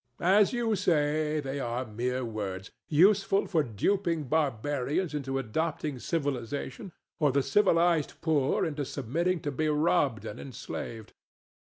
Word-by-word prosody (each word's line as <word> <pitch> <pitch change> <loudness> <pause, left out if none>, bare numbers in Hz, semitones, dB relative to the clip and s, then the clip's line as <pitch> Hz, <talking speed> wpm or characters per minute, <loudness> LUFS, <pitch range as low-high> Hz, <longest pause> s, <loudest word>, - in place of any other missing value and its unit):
As 195 +3 +5
you 235 -3 0
say, 155 -4 +1
they 135 0 -4
are 120 0 -2
mere 125 +3 -2
words, 100 -4 -5 0.2
useful 195 +5 +4
for 165 -5 +1
duping 165 - 0
barbarians 145 - -1
into 135 -2 -2
adopting 150 +3 -2
civilization, 140 - -3 0.3
or 150 -3 +3
the 140 +1 +2
civilized 165 0 +2
poor 150 -5 +1
into 150 -3 -2
submitting 160 +7 -1
to 145 - -2
be 155 +3 0
robbed 145 - +1
and 105 - -6
enslaved. 115 -4 -7
145 Hz, 130 wpm, -29 LUFS, 125-165 Hz, 0.3 s, As